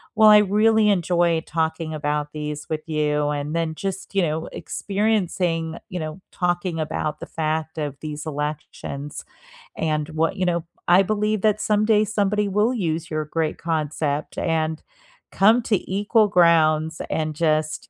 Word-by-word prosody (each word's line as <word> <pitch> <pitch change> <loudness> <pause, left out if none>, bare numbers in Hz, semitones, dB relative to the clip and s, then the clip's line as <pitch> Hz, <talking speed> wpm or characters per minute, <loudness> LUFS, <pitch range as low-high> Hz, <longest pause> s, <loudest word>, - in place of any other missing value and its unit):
Well, 215 -1 +7
I 210 0 +9
really 210 +1 +3
enjoy 175 -3 +2
talking 160 0 -2
about 150 0 -2
these 150 -1 -5
with 155 -1 -2
you, 150 -1 +1
and 150 +2 -3
then 165 -1 -1
just, 195 +1 -5
you 195 - +4
know, 160 +1 -2
experiencing, 180 -6 -1
you 180 -2 -4
know, 155 +4 -6
talking 175 -1 -1
about 155 -1 -2
the - - -6
fact 160 0 -2
of 145 -3 -3
these 150 0 -6
elections, 150 -1 -5 0.5
and 155 -1 -1
what 160 +1 0
you 185 - 0
know, 170 -1 0 0.2
I 180 +2 +6
believe 210 0 0
that 210 0 +2
someday 210 0 +3
somebody 210 0 0
will 210 +5 +2
use 165 -5 -2
your 155 -1 -1
great 155 +1 -2
concept 155 -2 -2
and 160 -1 -1 0.5
come 220 +5 +4
to 205 -5 -1
equal 210 +2 +3
grounds 160 -3 +3
and 155 -1 -1
just, 155 -1 0
165 Hz, 150 wpm, -23 LUFS, 155-195 Hz, 0.5 s, I